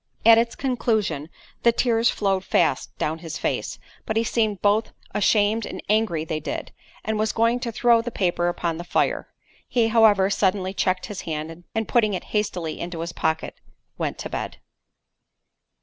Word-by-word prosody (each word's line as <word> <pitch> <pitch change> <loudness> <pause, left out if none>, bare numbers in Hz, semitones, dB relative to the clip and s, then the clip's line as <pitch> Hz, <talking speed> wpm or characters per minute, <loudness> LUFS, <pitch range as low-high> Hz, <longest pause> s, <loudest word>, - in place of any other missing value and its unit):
At 230 0 +8
its 235 0 0
conclusion, 220 - -1 0.3
the 235 - +5
tears 230 -1 +2
flowed 195 -2 0
fast - - +1
down 160 +2 -2
his 165 +1 -6
face; - - -2 0.3
but 220 - 0
he 225 - +3
seemed 220 -4 0
both 210 +2 +2 0.2
ashamed 210 +2 +2
and - - -6
angry 210 -7 +1
they 155 -1 -2
did, 155 - -5 0.3
and 220 0 -1
was 215 0 +1
going 230 +2 +2
to 240 -1 -3
throw 235 0 +4
the 240 - -4
paper 175 -5 0
upon 170 -1 -1
the - - -4
fire—he 225 +5 -1
however 210 -4 +5
suddenly 190 -1 +1
checked 185 -1 0
his 210 -4 -6
hand, 160 +2 -5
and 225 -1 -1
putting 215 -5 +2
it - - -4
hastily 180 -7 -1
into 170 -1 -5
his 170 +1 -4
pocket, 160 0 -2 0.4
went - - -2
to - - -6
bed. - - -4
205 Hz, 165 wpm, -24 LUFS, 175-225 Hz, 0.4 s, At